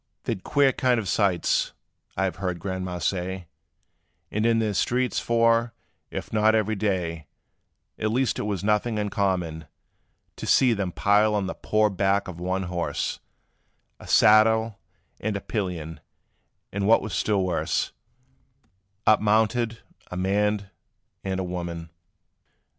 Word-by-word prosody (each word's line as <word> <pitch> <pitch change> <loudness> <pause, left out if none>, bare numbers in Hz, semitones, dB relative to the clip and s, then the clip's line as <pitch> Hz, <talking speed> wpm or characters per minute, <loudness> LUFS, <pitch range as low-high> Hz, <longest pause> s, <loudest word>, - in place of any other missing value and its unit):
"They - - -1
'd 95 - -9
queer 140 -2 +3
kind 125 -2 +1
of 105 - -4
sights, 95 -4 +1 0.4
I 95 - +1
have 95 - -1
heard 90 -3 -2
Grandma' 95 0 -4
say, 90 +2 -2 0.9
About 105 +2 +1
in 115 -1 +3
their 110 -2 0
streets; 125 +5 0
for, 115 0 +2 0.4
if - - -6
not 110 +1 +4
every 110 0 +1
day, 90 -6 -2 0.7
At 110 - 0
least 125 0 0
it 105 - -2
was 100 -2 -2
nothing 105 +2 +1
uncommon, 95 -6 -1 0.7
To - - -6
see 125 -3 +5
them 100 -4 -2
pile 105 +3 +3
on 100 -2 0
the 95 - -3
poor 110 0 +1
back 100 +1 +1
of 90 -2 -8
one 95 +2 -1
horse 90 -1 -2 0.8
A - - -12
saddle 110 0 +5 0.4
and 100 -1 -2
pillion; 90 -7 -3 0.7
and 100 0 -1
what 115 - +5
was 110 - -5
still 100 0 +1
worse, 90 -3 -1 1.1
Up 110 - +5
mounted 110 +2 +1 0.3
a 90 - -6
man 100 +1 0 0.5
and 95 -1 -2
a - - -1
woman! 85 -2 -5
100 Hz, 140 wpm, -25 LUFS, 90-110 Hz, 1.1 s, see